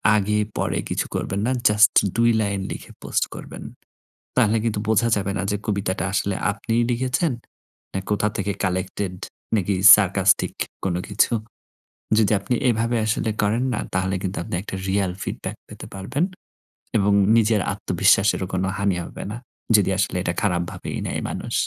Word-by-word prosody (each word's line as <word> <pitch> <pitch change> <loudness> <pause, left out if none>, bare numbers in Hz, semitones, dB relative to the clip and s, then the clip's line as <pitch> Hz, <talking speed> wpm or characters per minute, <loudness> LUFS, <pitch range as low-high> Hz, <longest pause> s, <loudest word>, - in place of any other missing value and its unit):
আগে 105 0 +1 0.2
পরে - - -1
কিছু - - -1
করবেন 95 - -2
না। - - +1 0.2
জাস্ট 105 +1 +5 0.2
২ 115 0 +4
লাইন 100 -2 -1
লিখে - - -8
পোস্ট - - 0
করবেন। - - -9 0.7
তাহলে 115 -3 +3
কিন্তু 110 -3 -1
বোঝা 110 +2 +3
যাবে 100 -1 -1
না - - -1
যে 105 - 0
কবিতাটা 100 -4 -1
আসলে 100 -1 0 0.2
আপনিই 115 +3 -1
লিখেছেন। 130 +6 0 0.6
না 95 - -1
কোথা 105 0 +1
থেকে 100 0 -1
কালেক্টেড, 95 +1 -2 0.4
নাকি 100 -1 0 0.2
সারকাস্টিক 100 -1 +2 0.3
কোন 95 -3 0
কিছু। 105 +4 +2 0.9
যদি 110 -1 +3
আপনি 125 - -1
এভাবে 115 0 +1
আসলে 110 +1 0
করেন 110 +5 +1
না - - -1 0.2
তাহলে 95 +1 0
কিন্তু 95 0 -3
আপনি 85 - -6
একটা 100 - -7
রিয়াল 95 -1 +1
ফিডব্যাক - - -5
পেতে - - -10
পারবেন। 100 - -1 0.7
এবং 100 0 +2 0.3
নিজের 110 -2 +3
আত্মবিশ্বাসেরও 100 -1 +2
কোনো 95 +1 0
হানি 100 -3 +1
হবে - - -8
না। 110 - -5 0.4
যদি 100 -2 +4
আসলে 95 - 0
এটা 85 - -1
খারাপ 90 -4 +1
ভাবেই - - -6
নেয় - - -3
মানুষ। - - -5
100 Hz, 160 wpm, -23 LUFS, 95-110 Hz, 0.9 s, জাস্ট